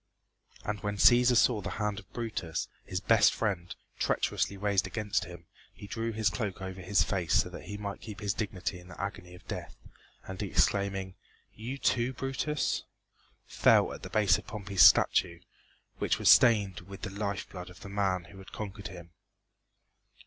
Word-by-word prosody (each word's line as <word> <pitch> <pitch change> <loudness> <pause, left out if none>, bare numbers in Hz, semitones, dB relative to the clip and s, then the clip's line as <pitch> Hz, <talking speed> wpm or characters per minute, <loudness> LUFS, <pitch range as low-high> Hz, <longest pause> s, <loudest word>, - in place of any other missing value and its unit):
And 105 0 -2
when 105 -1 -3
Cæsar 120 +4 +6
saw 115 -3 +4
the 100 - -4
hand 105 -2 -1
of 95 - -17
Brutus, 110 -9 -3 0.2
his 90 - -3
best 110 +1 +5
friend, 95 -6 -2 0.2
treacherously 100 - 0
raised 100 -1 +1
against 105 0 -1
him, 85 -1 -11 0.3
he - - -10
drew 115 +3 -3
his 110 -2 +1
cloak 105 -3 -3
over 95 -1 -6
his 95 +1 +2
face 90 -3 -1
so - - +3
that - - -10
he 105 - -6
might 100 -1 -6
keep 105 -3 -8
his 100 -2 -1
dignity 95 -4 -4
in 90 - -15
the 90 - -12
agony 90 -2 -6
of 90 - -17
death, - - -6 0.5
and 95 -1 -6
exclaiming 100 -1 0 0.4
"You, 120 +6 -6
too, 125 -1 +1
Brutus?" 135 +4 -1 0.6
fell - - +3
at - - -9
the - - -8
base 105 -1 +3
of - - -15
Pompey's 100 -4 -2
statue, 85 +3 +5 0.6
which - - +1
was - - +3
stained 100 -6 +5
with 95 +2 -12
the 100 - -4
life 100 -1 -3
blood 90 -1 -9
of 90 - -15
the - - -9
man 95 -3 0
who 95 +3 -14
had 95 - -13
conquered 100 -1 -6
him. 85 -2 -11
100 Hz, 180 wpm, -30 LUFS, 95-105 Hz, 0.6 s, Cæsar